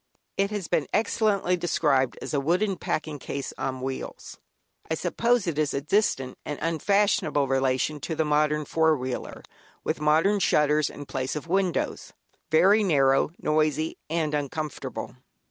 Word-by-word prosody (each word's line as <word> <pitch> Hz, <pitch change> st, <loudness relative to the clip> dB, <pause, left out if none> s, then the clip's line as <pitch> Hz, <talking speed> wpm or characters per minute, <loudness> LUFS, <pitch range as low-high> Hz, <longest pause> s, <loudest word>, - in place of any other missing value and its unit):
It 195 Hz, 0 st, +1 dB
has 205 Hz, -5 st, -4 dB
been 145 Hz, -, 0 dB
excellently 210 Hz, -4 st, +1 dB
described 150 Hz, -6 st, +1 dB
as -, -, -5 dB
"a 145 Hz, -, +2 dB
wooden 180 Hz, +8 st, +1 dB
packing 155 Hz, -4 st, -3 dB
case 140 Hz, +1 st, -5 dB
on 130 Hz, -1 st, -3 dB
wheels." 130 Hz, 0 st, -6 dB, 0.5 s
I 160 Hz, -, +1 dB
suppose 230 Hz, +7 st, +1 dB
it 160 Hz, -4 st, -2 dB
is 150 Hz, -2 st, 0 dB
a -, -, +1 dB
distant 140 Hz, -6 st, 0 dB
and 145 Hz, -, -4 dB
unfashionable 165 Hz, -3 st, +1 dB
relation 135 Hz, +2 st, +1 dB
of 150 Hz, +3 st, -5 dB
the 160 Hz, -, +2 dB
modern 150 Hz, 0 st, +1 dB
four 160 Hz, 0 st, +2 dB
wheeler, 130 Hz, -1 st, -5 dB, 0.4 s
with -, -, -2 dB
wooden 160 Hz, +7 st, +3 dB
shutters 150 Hz, -4 st, +3 dB
in 145 Hz, -, -9 dB
place 130 Hz, 0 st, -3 dB
of 150 Hz, -, -4 dB
windows; 185 Hz, 0 st, -1 dB, 0.4 s
very 190 Hz, +7 st, +5 dB
narrow, 135 Hz, -8 st, +3 dB
noisy, 155 Hz, +1 st, 0 dB
and 160 Hz, -2 st, -1 dB
uncomfortable. 150 Hz, +1 st, -4 dB
155 Hz, 145 wpm, -26 LUFS, 140-180 Hz, 0.5 s, very